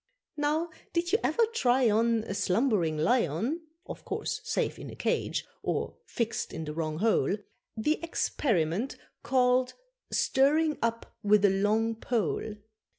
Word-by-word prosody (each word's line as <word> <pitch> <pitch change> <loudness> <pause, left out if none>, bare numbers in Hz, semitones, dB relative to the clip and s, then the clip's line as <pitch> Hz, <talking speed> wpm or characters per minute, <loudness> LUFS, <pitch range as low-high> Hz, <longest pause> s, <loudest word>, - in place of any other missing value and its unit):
Now 305 +3 0 0.2
did 345 0 0
you 435 - +4
ever 465 - +3
try 255 - +3
on 225 +1 +2
A 200 - -4
slumbering 190 - +1
lion 230 - +1 0.2
(Of - - -8
course - - -3
safe - - -1
in - - -7
a - - -9
cage, - - -1 0.2
or - - -2
fixed 230 -2 -2
in 160 - -4
the 150 - -5
wrong 155 -1 -2
hole) 215 0 +2 0.4
The 300 +8 +1
experiment 225 - 0 0.3
called 255 -1 +2 0.4
stirring 300 +3 +3
up 230 0 -2
with 210 -1 +4
a 200 - +5
long 215 +4 +2
pole? 220 -2 -2
230 Hz, 140 wpm, -29 LUFS, 200-275 Hz, 0.4 s, a